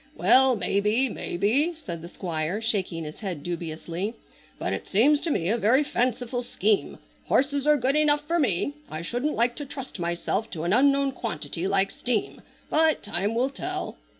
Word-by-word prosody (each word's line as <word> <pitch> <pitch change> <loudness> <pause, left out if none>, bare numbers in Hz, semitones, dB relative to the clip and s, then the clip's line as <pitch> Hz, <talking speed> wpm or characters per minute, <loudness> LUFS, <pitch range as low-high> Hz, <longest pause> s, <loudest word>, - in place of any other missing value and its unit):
"Well, 260 -1 +5
maybe, 210 +5 +1
maybe," 235 - 0
said 170 - -7
the 170 - -9
Squire 170 +1 -3
shaking 195 -7 -1
his 150 0 -8
head 180 -9 -5
dubiously, 170 +4 -4 0.4
"but - - -2
it - - -5
seems 280 +9 +4
to 335 - -1
me 175 - 0
a 230 +5 +1
very 240 +7 +4
fanciful 245 -2 -1
scheme. 215 -4 0 0.3
Horses 280 +1 +1
are 300 0 +5
good 265 +2 +1
enough 295 -1 +3
for 340 +3 0
me. 255 - +1 0.2
I 155 +2 -5
shouldn't 245 - -2
like 240 +1 +1
to 290 - -5
trust 265 -6 -7
myself 175 +5 -2
to 160 -3 -4
an 175 +3 +1
unknown 275 +2 +4
quantity 215 -7 -4
like 195 0 +1
steam, 240 -4 -2 0.3
but 315 0 +3
time 205 +2 +2
will 255 +3 +1
tell." 370 +6 -4
230 Hz, 175 wpm, -26 LUFS, 185-275 Hz, 0.4 s, Well